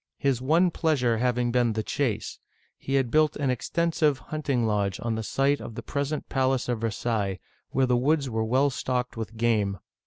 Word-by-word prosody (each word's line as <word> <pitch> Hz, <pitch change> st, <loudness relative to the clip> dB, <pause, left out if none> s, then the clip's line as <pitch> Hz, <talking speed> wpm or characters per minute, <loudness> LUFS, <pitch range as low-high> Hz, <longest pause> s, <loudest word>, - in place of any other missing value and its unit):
His 135 Hz, -3 st, 0 dB
one 165 Hz, +7 st, +3 dB
pleasure 125 Hz, -9 st, +1 dB
having 125 Hz, 0 st, +1 dB
been 120 Hz, -2 st, +2 dB
the 110 Hz, 0 st, -2 dB
chase, 110 Hz, -4 st, -2 dB, 0.4 s
he 135 Hz, -, -2 dB
had 130 Hz, -4 st, +1 dB
built 155 Hz, 0 st, +3 dB
an 140 Hz, -3 st, 0 dB
extensive 160 Hz, +2 st, +1 dB
hunting 140 Hz, -4 st, -2 dB
lodge 100 Hz, -4 st, 0 dB
on 115 Hz, -1 st, -1 dB
the 110 Hz, -, -2 dB
site 135 Hz, +5 st, +1 dB
of 115 Hz, -, -8 dB
the -, -, -6 dB
present 145 Hz, +1 st, -3 dB
palace 130 Hz, -1 st, +1 dB
of 120 Hz, -3 st, -1 dB
Versailles 110 Hz, -3 st, -1 dB
(vSr -, -, -10 dB
sa'y'), -, -, -36 dB, 0.3 s
where 135 Hz, 0 st, +2 dB
the 125 Hz, -1 st, +2 dB
woods 140 Hz, +3 st, +2 dB
were 110 Hz, -2 st, -1 dB
well 130 Hz, +5 st, +2 dB
stocked 125 Hz, 0 st, -2 dB
with 115 Hz, 0 st, -6 dB
game. 110 Hz, -4 st, +1 dB
125 Hz, 195 wpm, -26 LUFS, 115-140 Hz, 0.4 s, one